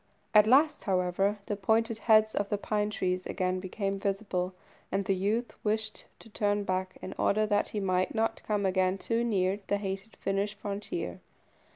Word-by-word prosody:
At 210 0 +7
last, 295 +5 +4
however, 190 +2 +1
the 205 - -2
pointed 220 +3 +1
heads 215 -1 +5
of 200 0 -1
the 205 - 0
pine 210 0 -1
trees 185 -3 -1
again 185 -1 -1
became 195 +1 -3
visible, 195 -2 -2 0.4
and 195 0 0
the 195 - +2
youth 210 +6 -1
wished 215 0 -1
to - - -15
turn 205 -1 0
back, 185 -1 -2
in - - -5
order 215 +1 +3
that 205 -1 +1
he 210 - -3
might 185 0 0
not 225 0 0
come 205 -2 -1
again 185 0 +2
too 230 +4 0
near 195 -3 +1
the 205 - +1
hated 195 +2 -5
Finnish 200 +2 -1
frontier. 205 - -4
205 Hz, 175 wpm, -30 LUFS, 190-215 Hz, 0.4 s, At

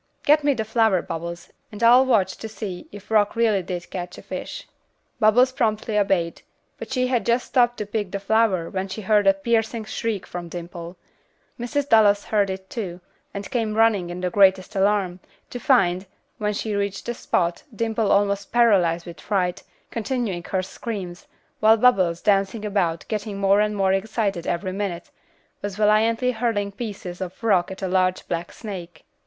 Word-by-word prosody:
Get 300 +1 +4
me 285 -1 +3
the 220 - -2
flower, 220 -4 +2
Bubbles, 170 +1 -6 0.2
and 210 +2 -6
I'll 250 +3 +7
watch 200 -7 +2
to 220 - -7
see 200 -4 -7
if 205 +1 -12
Rock 210 -2 +3
really 225 -4 +2
did 175 -1 -6
catch 180 -1 -6
a - - -11
fish." - - -7 0.5
Bubbles 245 +4 +5
promptly 220 -3 -1
obeyed, 195 -5 +1 0.4
but - - -8
she 255 -1 +1
had 250 -2 +1
just 240 +1 +1
stooped 240 -1 +2
to 210 - -3
pick 205 -1 -3
the 200 - -4
flower 200 -4 +2
when 190 0 -2
she 195 +3 -6
heard 205 0 +3
a 195 - +7
piercing 225 +2 0
shriek 215 -2 -3
from 175 -1 -7
Dimple. 170 0 -8 0.6
Mrs. 280 +4 -1
Dallas 205 -4 +5
heard 205 -2 +1
it, 190 0 -6
too, 185 -7 -5 0.3
and 200 0 -7
came 225 -4 -1
running 215 -6 +3
in 175 +1 -6
the 180 -1 -1
greatest 190 -1 +3
alarm, 195 -2 +1 0.3
to 245 - -5
find, 190 -9 +2 0.3
when 210 -1 0
she 215 +1 -3
reached 200 -1 -2
the 240 - -2
spot, 175 -7 -1
Dimple 225 -1 -1
almost 200 0 +1
paralyzed 190 -8 +3
with 170 -3 -10
fright, 180 -4 -1 0.3
continuing 225 -6 -2
her 190 -1 -1
screams, 190 -3 -6 0.3
while 220 +1 +6
Bubbles, 185 -8 +3
dancing 205 +1 +1
about, 185 -5 0
getting 210 -2 -3
more 195 +1 +3
and 210 0 0
more 190 -1 +2
excited 195 -3 -1
every 185 +2 -1
minute, 185 -3 -4 0.5
was 205 -2 -4
valiantly 220 +4 +3
hurling 220 -4 -1
pieces 200 -4 -7
of 185 +4 -7
rock 190 -6 +3
at 190 +1 -8
a - - 0
large 185 0 +1
black 170 0 -3
snake. 180 -6 -8
205 Hz, 175 wpm, -23 LUFS, 185-225 Hz, 0.6 s, I'll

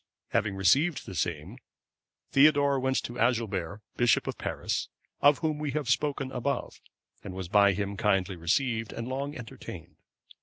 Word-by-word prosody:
Having 105 -2 0
received 140 - +2
the 100 - -8
same, 80 -3 -3 0.7
Theodore 140 -1 +5
went 130 0 0
to 120 +1 -6
Agilbert, 105 -6 0 0.2
bishop 120 -2 +3
of - - -3
Paris,(530) - - -2
of 145 - +1
whom 155 -2 -1
we 150 -1 -2
have 145 -4 -1
spoken 135 -1 0
above, 130 +3 -3 0.4
and 95 -2 -7
was 95 -2 -5
by 100 +1 +5
him 100 +1 -3
kindly 95 -1 +1
received, 110 +6 0
and 115 - -5
long 140 +3 -3
entertained. 120 -3 -10
120 Hz, 150 wpm, -28 LUFS, 100-140 Hz, 0.7 s, Theodore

